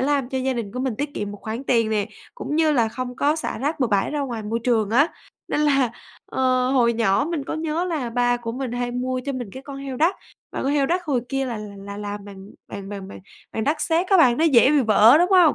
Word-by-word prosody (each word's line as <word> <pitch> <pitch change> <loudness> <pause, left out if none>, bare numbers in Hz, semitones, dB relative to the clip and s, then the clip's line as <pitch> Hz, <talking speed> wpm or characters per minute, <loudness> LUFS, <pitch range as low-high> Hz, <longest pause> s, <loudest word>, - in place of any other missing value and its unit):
làm 275 -1 +1
cho 265 - -2
gia 260 +1 0
đình 230 -5 -4
của 250 - -4
mình 260 -3 -1
tiết 285 +3 -4
kiệm 205 -1 -3
một 205 - -9
khoản 225 +5 -5
tiền 230 -4 +2
nè, 210 -2 0 0.3
cũng 300 -10 -4
như 315 -1 +3
là 235 -5 +2
không 250 +2 -6
có 290 +3 +2
xả 320 - -4
rác 290 +5 -2
bừa 255 - +3
bãi 200 -3 +1
ra 295 - -2
ngoài 240 -5 -4
môi 220 +2 -2
trường 220 -4 +2
á. 280 +8 +4 0.4
Nên - - 0
là, 275 -5 +3 0.4
ờ, 255 -1 +1
hồi 245 -3 +3
nhỏ 225 +3 +2
mình 315 -5 -2
có - - -4
nhớ 320 +2 -1
là 310 -9 -2
ba 245 +1 +2
của 235 -1 -5
mình 255 -1 -4
hay 245 0 -2
mua 255 +1 -2
cho 280 - -2
mình 245 -6 -5
cái 265 - -9
con 275 0 -8
heo 275 -2 -6
đất, 330 +7 +3 0.4
và - - -3
con 275 - 0
heo 285 -2 +2
đất 355 +3 0
hồi 275 -7 0
kia 270 0 -1
là 235 -3 -4
là 200 -1 -8
làm 205 0 -6
bằng 195 -1 -11 0.2
bằng 200 -1 -7
bằng 195 -2 -7
bằng - - -10 0.3
bằng 220 - -2
đất 300 +2 0
sét 335 +2 +1
á 385 - +4
bạn. 255 -9 +5
Nó 320 - +3
dễ 270 -4 +6
bị 295 -1 +4
vỡ, 225 +3 +6
đúng 355 +3 +2
hông? 360 -5 +6
255 Hz, 270 wpm, -23 LUFS, 225-290 Hz, 0.4 s, dễ